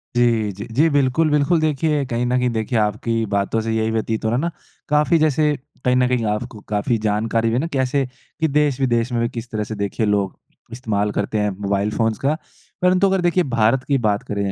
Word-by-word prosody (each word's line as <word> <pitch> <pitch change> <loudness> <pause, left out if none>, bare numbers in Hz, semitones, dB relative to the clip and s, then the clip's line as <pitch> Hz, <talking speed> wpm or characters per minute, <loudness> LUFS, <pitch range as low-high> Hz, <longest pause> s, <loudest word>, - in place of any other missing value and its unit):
जी, 115 -3 +2
जी। 100 +3 -8
जी, 155 +5 +4
बिल्कुल, 145 +2 +2
बिल्कुल 150 +3 +3
देखिए, 150 -1 +1
कहीं 120 -1 -1
न 125 +1 +1
कहीं 125 0 +1
देखिए 115 +1 -1
आपकी 110 +2 0
बातों 100 +3 +1
से 115 0 -2
यही 110 0 0
व्यतीत 110 0 -2
हो - - +2
रहा 120 - +1
है - - 0
ना 170 +2 -1 0.4
काफ़ी 150 +3 +3
जैसे 150 -1 +2 0.3
कहीं 125 0 +3
न 125 0 +3
कहीं 125 -2 0
आपको 105 +2 -3
काफ़ी 105 +3 0
जानकारी 110 +2 +1
भी - - -1
है 125 - +2
ना 165 - -1
कैसे, 135 +1 +1 0.3
कि 160 - +2
देश-विदेश 135 -5 +1
में 120 -1 0
भी 115 - 0
किस 115 0 -7
तरह 110 -1 -2
से 110 +1 -6
देखिए 100 +2 -1
लोग 100 -2 0 0.3
इस्तेमाल 105 -4 -1
करते 105 +1 -2
हैं 105 0 +1
मोबाइल 100 +1 0
फ़ोन्स 115 -2 +1
का। 145 +3 0 0.4
परंतु 185 +2 +4
अगर 190 -1 +1
देखिए 175 +1 +2
भारत 120 0 +1
की 140 - +2
बात 105 +3 0
करें, 100 -4 -2
120 Hz, 220 wpm, -21 LUFS, 110-140 Hz, 0.4 s, जी